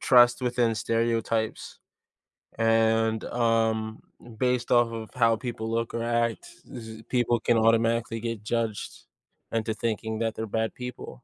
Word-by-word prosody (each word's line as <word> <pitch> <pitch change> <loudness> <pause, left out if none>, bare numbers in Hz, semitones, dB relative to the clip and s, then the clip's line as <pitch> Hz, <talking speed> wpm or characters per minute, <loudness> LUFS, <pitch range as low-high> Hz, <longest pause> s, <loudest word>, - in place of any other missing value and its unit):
trust 120 0 +5
within 120 -2 +1
stereotypes, 115 0 -1 0.8
and, 115 0 +2
um, 115 -2 0 0.2
m 120 - -12
based 125 +1 0
off 120 -1 +4
of 110 -1 -6
how 115 -2 +4
people 115 -1 -5
look 115 0 -1
or 115 0 -2
act, 115 - 0 0.2
it's 120 -3 -8
just, 110 0 -11
people 120 -2 +2
can 120 - +2
automatically 115 0 +2
get 115 -2 -4
judged 115 -1 -3 0.5
into 110 -1 -1
thinking 110 0 -3
that 115 -1 -1
they're 110 - -4
bad 110 +1 -1
people. 125 0 -8
115 Hz, 145 wpm, -27 LUFS, 110-120 Hz, 0.8 s, trust